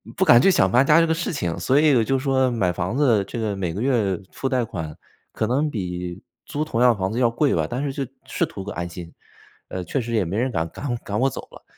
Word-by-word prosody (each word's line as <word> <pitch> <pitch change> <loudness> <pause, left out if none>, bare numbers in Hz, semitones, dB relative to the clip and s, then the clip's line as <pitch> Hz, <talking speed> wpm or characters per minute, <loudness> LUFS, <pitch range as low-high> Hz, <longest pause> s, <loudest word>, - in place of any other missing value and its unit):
不 - - +2
敢 120 - +7
去 195 - +5
想 95 - +3
搬 125 +3 +5
家 155 +3 +6
这 165 - +3
个 160 - +1
事 170 +1 -3
情。 85 - -2
所 135 +2 +3
以 150 -2 +4
我 115 - +4
就 135 +3 0
说 130 -1 +1
买 100 -7 +1
房 90 +5 -3
子 120 -8 +3
这 120 - -5
个 110 -3 -1
每 90 -4 -3
个 100 - -4
月 115 -8 +1
付 135 - -3
贷 130 -2 +1
款 80 -9 -6 0.4
可 110 - -2
能 135 +6 +1
比 90 -4 -5 0.2
租 150 - -2
同 155 -7 -3
样 125 -2 +5
房 95 0 -2
子 115 - -4
要 125 - +4
贵 140 +4 +1
吧， - - +1
但 125 +3 -3
是 140 - -1
就 135 0 -3 0.2
是 - - 0
图 95 - -8
个 - - -6
安 85 0 -4
心， 85 -1 -9 0.6
呃， 95 - -4
确 135 - -2
实 115 -1 -4
也 110 -5 +2
没 95 +6 -3
人 125 +2 0
敢 80 -5 -2
赶 125 - -4
赶 105 -2 -4
我 130 - +3
走 135 - -4
了。 - - -14
115 Hz, 290 characters per minute, -23 LUFS, 95-135 Hz, 0.6 s, 敢